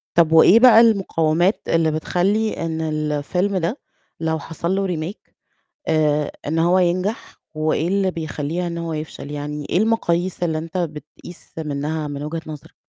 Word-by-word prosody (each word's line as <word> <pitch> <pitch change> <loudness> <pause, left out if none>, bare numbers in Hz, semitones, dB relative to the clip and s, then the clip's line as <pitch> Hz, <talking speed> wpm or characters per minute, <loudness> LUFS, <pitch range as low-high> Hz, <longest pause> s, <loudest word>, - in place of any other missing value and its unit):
طب 165 -2 +4
وإيه 175 +7 +7
بقى 230 -2 +8
المقاومات 185 -4 +2
اللي 165 -1 +2
بتخلّي 195 +7 0
إن 160 -1 -3
الفيلم 155 +5 -1
ده 185 - -2 0.4
لو 160 -1 -1
حصل 170 +4 -3
له 195 0 0
Remake 175 +3 -5 0.6
آآ 150 -2 +2 0.2
إن 160 +2 -1
هو 175 +3 +3
ينجح، 185 +5 -1 0.2
وإيه 155 +1 0
اللي 195 -1 +1
بيخلّيها 160 +1 -3
إن 170 0 -4
هو 165 -1 -4
يفشل؟ 155 -2 -6
يعني 150 0 -5
إيه 175 - +2
المقاييس 185 -5 0
اللي 160 -2 0
أنت 165 +2 -6
بتقيس 155 +1 -7
منها، 150 0 -3
من 145 0 -5
وجهة 160 +2 -4
نظرك؟ 150 -3 -10
165 Hz, 155 wpm, -21 LUFS, 155-180 Hz, 0.6 s, بقى